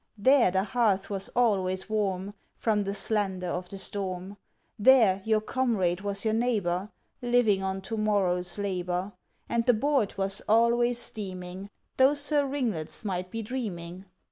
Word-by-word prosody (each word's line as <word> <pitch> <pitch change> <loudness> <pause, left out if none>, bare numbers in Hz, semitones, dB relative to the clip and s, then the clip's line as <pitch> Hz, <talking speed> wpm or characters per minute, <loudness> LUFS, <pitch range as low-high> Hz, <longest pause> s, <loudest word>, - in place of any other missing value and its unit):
There 260 0 +5
the 190 +1 +1
hearth 205 -2 0
was 195 -1 -3
always 190 -6 +1
warm, 200 -2 -2 0.2
From 210 -2 +1
the 195 - -2
slander 195 -3 -1
of 180 +1 -4
the 195 - -7
storm. 190 0 -4 0.4
There 215 -5 +5
your 220 -1 +2
comrade 215 -8 0
was 200 +1 -2
your 220 - +2
neighbor, 210 -5 0 0.3
Living 240 -5 +2
on 190 0 -3
to 225 +4 -5
morrow's 195 -4 0
labor. 185 -1 -2 0.3
And 235 0 0
the 245 - +5
board 270 -2 +1
was 195 0 +1
always 235 +2 +3
steaming, 190 -4 -6 0.3
Though 265 +3 +5
Sir 290 0 +2
Ringlets 225 - -3
might 185 -2 -3
be 225 +3 -5
dreaming. 195 -6 -6
205 Hz, 145 wpm, -28 LUFS, 185-235 Hz, 0.4 s, There